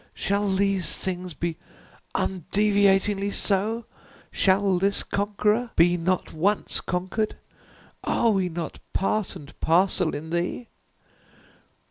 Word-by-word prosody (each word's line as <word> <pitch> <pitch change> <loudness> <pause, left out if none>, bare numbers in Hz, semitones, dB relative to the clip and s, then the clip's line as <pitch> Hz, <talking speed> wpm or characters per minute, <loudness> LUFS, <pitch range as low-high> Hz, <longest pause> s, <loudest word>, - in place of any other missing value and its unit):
shall 200 +1 0
these 195 -2 +1
things 180 -3 -4
be 170 -1 -3 0.6
undeviatingly 200 +1 +2
so? 210 +4 0 0.5
shall 190 -1 +3
this 200 +2 +1
conqueror 210 +3 0
be 175 +1 +5
not 180 +1 -1
once 195 +6 0
conquered? 190 +4 -2 0.7
Are 230 - +2
we 190 -3 +1
not 170 0 -5
part 200 0 0
and 145 -6 -11
parcel 175 0 +2
in 160 +2 -6
Thee? 175 +8 -2
195 Hz, 105 wpm, -25 LUFS, 175-205 Hz, 0.7 s, be